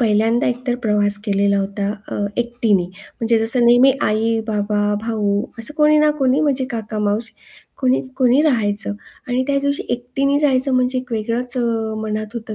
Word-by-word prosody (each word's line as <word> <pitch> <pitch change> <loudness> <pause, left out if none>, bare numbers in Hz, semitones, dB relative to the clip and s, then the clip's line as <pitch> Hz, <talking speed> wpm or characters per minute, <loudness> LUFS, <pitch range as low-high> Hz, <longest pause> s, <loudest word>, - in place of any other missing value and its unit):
पहिल्यांदा 225 +1 +2
एकतर 245 0 -2
प्रवास 205 -2 +3
केलेला 200 -1 +1
होता 200 +1 -2 0.2
अ, - - -5 0.3
एकटीने 235 -5 0
म्हणजे 220 +5 -3
जसं 230 +2 +4
नेहमी 245 +3 +6
आई, 225 +1 +1
बाबा, 210 -1 -1 0.2
भाऊ, 210 -3 -1 0.2
असं 230 +6 +1
कोणी 300 0 +4
ना 300 0 +4
कोणी 265 +1 +2
म्हणजे 275 -4 0
काका 220 -2 -5
माऊशी 210 +2 -2 0.5
कोणी, 255 0 +2 0.2
कोणी 255 +1 +3
राहायचं 210 -8 +1 0.4
आणि 250 +1 0
त्या 280 -1 +1
दिवशी 280 0 -1
एकटीने 270 +4 -1
जायचं 270 -2 +2
म्हणजे 255 0 +1
एक 255 -1 -8
वेगळंच 235 +3 -1
अ, 225 -2 -1
मनात 215 +1 -4
होतं 225 -2 -6
230 Hz, 165 wpm, -19 LUFS, 210-255 Hz, 0.5 s, नेहमी